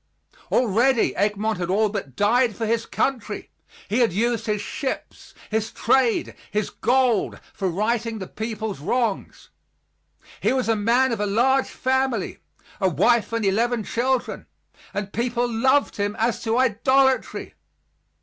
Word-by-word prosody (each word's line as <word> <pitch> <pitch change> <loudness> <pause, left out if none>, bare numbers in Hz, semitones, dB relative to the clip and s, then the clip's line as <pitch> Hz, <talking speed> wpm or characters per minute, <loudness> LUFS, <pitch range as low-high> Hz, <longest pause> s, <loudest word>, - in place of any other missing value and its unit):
Already 240 +2 +2
Egmont 210 0 0
had 175 -1 -2
all 210 +3 +3
but 195 - -5
died 230 +2 +2
for 225 - -2
his 230 +1 0
country. 235 -6 -2 0.4
He 215 +5 0
had 235 -5 +3
used 230 +5 0
his 210 -1 0
ships, 265 +6 -5 0.2
his 220 0 -1
trade, 245 -1 +1 0.2
his 210 -1 -2
gold, 245 -3 +1
for 190 - -2
righting 225 +5 -1
the 190 - -5
people's 220 -2 -5
wrongs. 225 - -2 0.9
He - - +1
was 260 -3 0
a 225 - +3
man 240 +5 +2
of 230 - -2
a 210 - 0
large 260 +6 +2
family 260 -4 -1 0.4
a 190 -3 +2
wife 225 - +2
and 230 -2 -1
eleven 225 +4 +1
children 250 +4 -1 0.4
and 205 0 -4
people 240 +1 0
loved 260 +5 +2
him 205 0 -1
as 230 +1 0
to 225 +1 0
idolatry. 260 +2 +2
230 Hz, 140 wpm, -23 LUFS, 210-245 Hz, 0.9 s, all